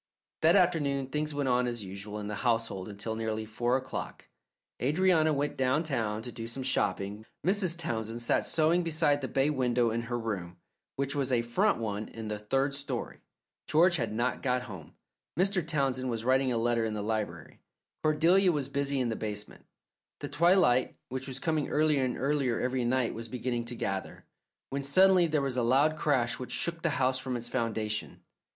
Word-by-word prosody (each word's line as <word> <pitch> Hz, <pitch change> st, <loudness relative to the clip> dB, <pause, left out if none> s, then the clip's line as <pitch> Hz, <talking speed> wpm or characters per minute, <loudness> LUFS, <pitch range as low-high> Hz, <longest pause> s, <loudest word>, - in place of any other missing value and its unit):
That 165 Hz, +2 st, +5 dB
afternoon 145 Hz, -8 st, +2 dB
things 150 Hz, +2 st, -1 dB
went 145 Hz, -2 st, -1 dB
on 125 Hz, 0 st, +2 dB
as 120 Hz, -3 st, -2 dB
usual 100 Hz, +2 st, -7 dB
in 105 Hz, -, -5 dB
the 105 Hz, 0 st, -4 dB
household 115 Hz, -5 st, 0 dB
until 105 Hz, +2 st, -5 dB
nearly 110 Hz, -1 st, -2 dB
four 120 Hz, +3 st, 0 dB
o'clock. 130 Hz, 0 st, -6 dB, 0.5 s
Adrianna 160 Hz, +3 st, +3 dB
went 145 Hz, 0 st, -1 dB
downtown 130 Hz, -6 st, 0 dB
to 120 Hz, -, -4 dB
do 115 Hz, -1 st, -6 dB
some 130 Hz, +3 st, -6 dB
shopping. 105 Hz, -5 st, -1 dB, 0.2 s
Mrs. 185 Hz, -3 st, +2 dB
Townsend 115 Hz, -8 st, -3 dB
sat -, -, +2 dB
sewing 165 Hz, +2 st, +2 dB
beside 155 Hz, -3 st, +2 dB
the 130 Hz, -, -2 dB
bay 135 Hz, +3 st, +1 dB
window 125 Hz, -4 st, +1 dB
in 115 Hz, +1 st, -1 dB
her 120 Hz, -, -1 dB
room, 95 Hz, -7 st, -4 dB, 0.4 s
which 140 Hz, 0 st, -1 dB
was 135 Hz, -2 st, -1 dB
a 120 Hz, -2 st, +2 dB
front 190 Hz, -, +2 dB
one 105 Hz, -2 st, -3 dB
in 110 Hz, -1 st, -7 dB
the 105 Hz, -1 st, -3 dB
third 135 Hz, +7 st, 0 dB
story. 140 Hz, 0 st, -5 dB, 0.5 s
George 175 Hz, +3 st, +4 dB
had 115 Hz, -4 st, -2 dB
not 120 Hz, +4 st, -1 dB
got 125 Hz, -2 st, 0 dB
home. 95 Hz, -10 st, -10 dB, 0.4 s
Mr. 190 Hz, 0 st, +2 dB
Townsend 135 Hz, -5 st, -1 dB
was 115 Hz, -1 st, -3 dB
writing 130 Hz, 0 st, +3 dB
a 120 Hz, -, 0 dB
letter 115 Hz, 0 st, +1 dB
in 110 Hz, -1 st, -2 dB
the 105 Hz, -, -3 dB
library. 105 Hz, -7 st, -4 dB, 0.4 s
Cordelia 170 Hz, +5 st, +4 dB
was 145 Hz, -4 st, -2 dB
busy 140 Hz, 0 st, 0 dB
in 125 Hz, -2 st, 0 dB
the 110 Hz, -, -1 dB
basement; 105 Hz, -1 st, -6 dB, 0.5 s
the -, -, -4 dB
twilight, 165 Hz, -8 st, +3 dB
which 130 Hz, +1 st, -4 dB
was 130 Hz, -1 st, -5 dB
coming 155 Hz, 0 st, -1 dB
earlier 150 Hz, -2 st, +2 dB
and 125 Hz, -1 st, -1 dB
earlier 135 Hz, -3 st, 0 dB
every 125 Hz, -1 st, 0 dB
night, 125 Hz, 0 st, +1 dB
was 115 Hz, 0 st, -6 dB
beginning 120 Hz, 0 st, -3 dB
to 120 Hz, +1 st, -2 dB
gather, 95 Hz, -4 st, -4 dB, 0.5 s
when 140 Hz, +1 st, -1 dB
suddenly 180 Hz, +5 st, +5 dB
there 155 Hz, -3 st, +1 dB
was 135 Hz, -2 st, -1 dB
a -, -, +2 dB
loud 135 Hz, +6 st, +3 dB
crash 130 Hz, -6 st, +1 dB
which 125 Hz, -, -6 dB
shook 170 Hz, -1 st, -1 dB
the 170 Hz, -, +1 dB
house 130 Hz, 0 st, +2 dB
from 130 Hz, -1 st, -3 dB
its 120 Hz, -, -5 dB
foundations. 110 Hz, -3 st, -2 dB
130 Hz, 185 wpm, -30 LUFS, 115-150 Hz, 0.5 s, That